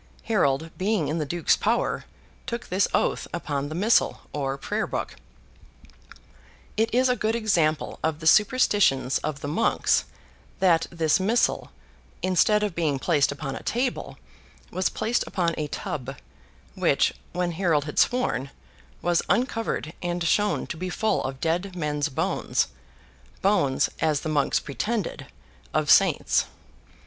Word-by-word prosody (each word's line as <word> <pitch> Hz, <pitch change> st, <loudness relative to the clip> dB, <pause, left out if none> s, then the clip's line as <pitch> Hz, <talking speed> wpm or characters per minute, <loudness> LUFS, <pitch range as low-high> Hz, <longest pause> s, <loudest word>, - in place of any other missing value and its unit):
Harold, 160 Hz, -, +1 dB
being 190 Hz, -5 st, +1 dB
in 160 Hz, +2 st, -1 dB
the 150 Hz, -, -2 dB
Duke's 170 Hz, +3 st, +2 dB
power, -, -, 0 dB, 0.4 s
took 235 Hz, -2 st, -5 dB
this 190 Hz, +2 st, +2 dB
oath -, -, 0 dB
upon 145 Hz, -3 st, -3 dB
the 155 Hz, -, -5 dB
Missal, 210 Hz, +6 st, +2 dB
or 135 Hz, -2 st, -2 dB
Prayer -, -, -2 dB
book. -, -, -4 dB, 1.6 s
It 225 Hz, +1 st, +1 dB
is 255 Hz, +2 st, +3 dB
a 250 Hz, -, +2 dB
good 220 Hz, -1 st, 0 dB
example 170 Hz, -10 st, +1 dB
of 160 Hz, -1 st, 0 dB
the 160 Hz, -, -8 dB
superstitions 205 Hz, -, +4 dB
of 150 Hz, -2 st, -4 dB
the -, -, -4 dB
monks, 160 Hz, +10 st, +2 dB, 0.5 s
that 175 Hz, -4 st, +3 dB
this 160 Hz, -1 st, +1 dB
Missal, 220 Hz, +6 st, +1 dB, 0.5 s
instead 185 Hz, +3 st, +3 dB
of 205 Hz, -4 st, -1 dB
being 160 Hz, -5 st, 0 dB
placed 145 Hz, 0 st, +2 dB
upon 140 Hz, -1 st, -5 dB
a -, -, -7 dB
table, 245 Hz, +2 st, -2 dB, 0.5 s
was 185 Hz, -1 st, 0 dB
placed 235 Hz, +2 st, 0 dB
upon 175 Hz, -4 st, 0 dB
a 150 Hz, -, -3 dB
tub; 140 Hz, -5 st, -5 dB, 0.6 s
which, -, -, +2 dB, 0.2 s
when 175 Hz, 0 st, -1 dB
Harold 165 Hz, -4 st, +1 dB
had 150 Hz, -, -2 dB
sworn, 140 Hz, -, +1 dB, 0.5 s
was 175 Hz, -1 st, +2 dB
uncovered, 225 Hz, -, 0 dB
and 175 Hz, 0 st, -2 dB
shown 205 Hz, +5 st, +1 dB
to 160 Hz, -, -6 dB
be 185 Hz, +2 st, -4 dB
full 220 Hz, +4 st, 0 dB
of 135 Hz, 0 st, -4 dB
dead 180 Hz, +4 st, -1 dB
men's 150 Hz, -2 st, -1 dB
bones—bones, 95 Hz, -, -1 dB
as 155 Hz, -3 st, +1 dB
the 155 Hz, -, -3 dB
monks 145 Hz, -2 st, +2 dB
pretended, 205 Hz, -, -3 dB, 0.5 s
of -, -, +2 dB
saints. -, -, +4 dB
170 Hz, 140 wpm, -25 LUFS, 145-205 Hz, 1.6 s, superstitions